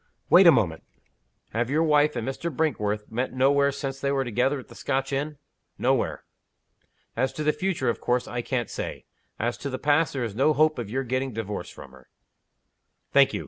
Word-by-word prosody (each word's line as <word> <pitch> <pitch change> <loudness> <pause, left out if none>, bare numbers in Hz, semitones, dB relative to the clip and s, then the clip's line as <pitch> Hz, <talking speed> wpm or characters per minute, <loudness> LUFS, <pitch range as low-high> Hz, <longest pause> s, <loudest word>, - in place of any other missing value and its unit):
"Wait 180 +1 +8
a - - +11
moment. 95 - +1 0.7
Have 120 +2 -1
your 155 +4 +2
wife 150 -2 +3
and 120 0 -3
Mr. 165 +5 -3
Brinkworth 105 -9 -1
met 125 +3 -2
nowhere 140 +2 +3
since 135 -1 -5
they 140 - 0
were 135 -1 +1
together 125 +4 +1
at 130 - -12
the - - -14
Scotch 135 0 -2
inn?" 145 +2 -2 0.4
"Nowhere." - - 0 0.9
"As 130 +3 0
to 155 - -4
the 150 0 +2
future, 185 -9 -1
of 120 - 0
course 125 0 0
I 120 - -3
can't 120 -1 -2
say. - - -5 0.3
As 120 +2 -2
to 140 - -4
the 130 - -3
past, 150 +3 +2
there 135 -3 -2
is 115 -4 -3
no 135 +7 +3
hope 155 -1 +3
of 115 -4 -5
your 135 +4 -1
getting 130 +1 -2
divorced 105 -2 -5
from 65 - -12
her." 65 -1 -18 1.0
"Thank - - +5
you. - - -1
135 Hz, 200 wpm, -26 LUFS, 120-145 Hz, 1.0 s, a